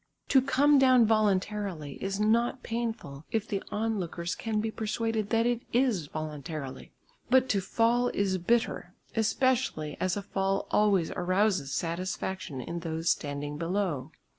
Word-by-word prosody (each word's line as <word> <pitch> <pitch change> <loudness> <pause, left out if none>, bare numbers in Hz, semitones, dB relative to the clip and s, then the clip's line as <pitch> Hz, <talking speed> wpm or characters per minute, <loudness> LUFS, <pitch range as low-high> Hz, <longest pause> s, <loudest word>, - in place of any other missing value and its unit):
To 265 - +6
come 275 +2 +4
down 255 -3 +6
voluntarily 200 -7 0
is 195 +1 -2
not 235 +4 +2
painful 225 -12 -4
if 220 -1 -1
the 200 -2 -2
onlookers 195 -5 -2
can 220 -2 -2
be 220 +1 -1
persuaded 220 -1 -2
that 230 0 +2
it 240 -1 +1
is 235 - +1
voluntarily, 150 -3 -6 0.4
but 260 +1 +5
to 200 - +2
fall 235 +5 +2
is 195 -4 0
bitter, 185 -2 0 0.2
especially 225 - +1
as 185 +1 0
a 200 - -4
fall 195 0 -1
always 200 -5 +3
arouses 185 -4 +1
satisfaction 175 -3 -3
in 170 +7 -5
those 165 0 0
standing 145 0 -3
below. 165 -5 -1
200 Hz, 140 wpm, -29 LUFS, 170-225 Hz, 0.4 s, To